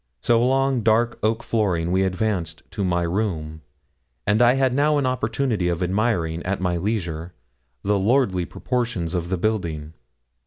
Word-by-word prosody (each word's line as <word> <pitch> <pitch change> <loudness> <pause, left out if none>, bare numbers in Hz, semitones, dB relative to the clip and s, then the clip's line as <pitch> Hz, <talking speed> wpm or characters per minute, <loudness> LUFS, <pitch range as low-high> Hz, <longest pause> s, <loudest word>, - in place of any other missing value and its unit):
So 115 - +3
along 135 0 +2
dark 115 +2 +2
oak 110 +2 0
flooring 90 -7 0
we 95 +1 +2
advanced 90 -4 -1
to 100 - -3
my 90 -2 +1
room, 85 -4 -2 0.6
and 105 +3 +2
I 120 +1 +6
had 135 -2 +2
now 150 +3 +3
an 140 - +1
opportunity 125 -5 0
of 85 +1 -1
admiring, 90 -4 0
at 95 +2 -2
my 90 -1 0
leisure, 85 -4 -3 0.5
the 105 0 +2
lordly 100 -4 +2
proportions 115 -10 -2
of 85 -1 -2
the 95 - 0
building. 85 -7 -2
100 Hz, 155 wpm, -23 LUFS, 85-120 Hz, 0.6 s, I